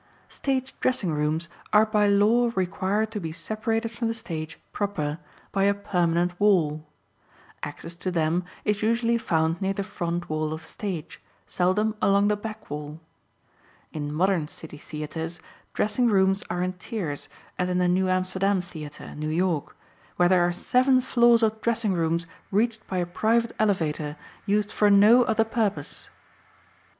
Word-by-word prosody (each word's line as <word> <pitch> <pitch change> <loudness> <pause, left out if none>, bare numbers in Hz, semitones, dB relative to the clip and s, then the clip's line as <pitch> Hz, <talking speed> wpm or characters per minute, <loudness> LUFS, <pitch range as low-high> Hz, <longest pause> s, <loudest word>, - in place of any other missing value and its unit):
Stage 265 -1 -2
dressing 205 -10 0
rooms 155 +2 0 0.2
are 215 +1 +6
by 210 -1 +2
law 215 +4 +4
required 195 +3 0
to 215 - -3
be 165 -4 -4
separated 225 +5 -2
from 230 0 -2
the 225 - -1
stage 160 -8 -6
proper 165 -7 -2 0.3
by 195 0 +2
a 200 0 +3
permanent 175 -3 0
wall. 160 -7 +2 0.7
Access 150 +3 -6
to 185 - -3
them 170 0 +1 0.2
is 210 -1 +1
usually 230 +1 +2
found 165 -4 0
near 195 0 +1
the 200 - -2
front 175 -2 -3
wall 155 0 -1
of 160 0 -7
the - - -15
stage, 180 -6 -6 0.2
seldom 200 +4 +1
along 200 +1 +4
the 210 - +2
back 215 +1 -7
wall. 150 +1 -6 0.9
In 145 -1 -4
modern 175 0 +1
city 150 -1 -10
theatres 160 +3 -5 0.4
dressing 215 +4 +1
rooms 195 -2 +3
are 175 0 -1
in 185 0 -1
tiers, 180 -6 -5 0.3
as 180 0 +1
in 180 - 0
the 180 0 +2
New 185 +1 +2
Amsterdam 185 +1 +1
Theatre, 155 -5 -8
New 155 +1 -4
York, 170 -2 -1 0.4
where 175 - +4
there 185 -1 +5
are 175 0 +3
seven 255 +8 +3
floors 240 -2 +4
of 220 0 +1
dressing 230 -3 +1
rooms 165 -1 0 0.2
reached 220 +2 0
by 185 - -3
a 175 - +1
private 225 +6 +1
elevator 160 -7 0 0.3
used 205 +1 +1
for 210 - +3
no 210 +5 +7
other 220 0 +2
purpose. 220 -3 -2
190 Hz, 160 wpm, -26 LUFS, 165-215 Hz, 0.9 s, no